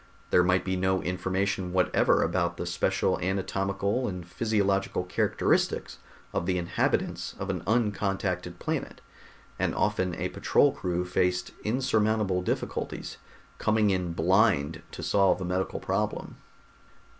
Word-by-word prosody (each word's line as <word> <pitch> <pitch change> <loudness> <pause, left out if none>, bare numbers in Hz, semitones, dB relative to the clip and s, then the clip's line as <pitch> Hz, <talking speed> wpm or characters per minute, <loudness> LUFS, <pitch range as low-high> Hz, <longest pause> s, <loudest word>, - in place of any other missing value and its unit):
There 90 - +5
might 90 0 +2
be 95 0 0
no 95 0 +1
information 95 +1 -1
whatever 95 -1 +3
about 85 0 0
the - - -3
special 85 0 0
anatomical 100 +4 -1
and 90 -3 -5
physiological 100 -2 0
characteristics 90 - 0 0.3
of 85 - -1
the 90 -1 +1
inhabitants 85 0 -1
of - - -2
an - - -3
uncontacted 95 -5 0
planet, - - -3 0.6
and - - 0
often 95 -3 0
a - - -2
patrol - - +3
crew 90 0 -2
faced 90 0 0
insurmountable 110 -5 +1
difficulties, 90 - -3 0.4
coming 110 -1 +3
in 90 -3 -1
blind 85 -3 +2
to - - -8
solve 100 -1 +3
a 95 - -3
medical 90 +1 -1
problem. - - -2
95 Hz, 125 wpm, -28 LUFS, 90-100 Hz, 0.6 s, There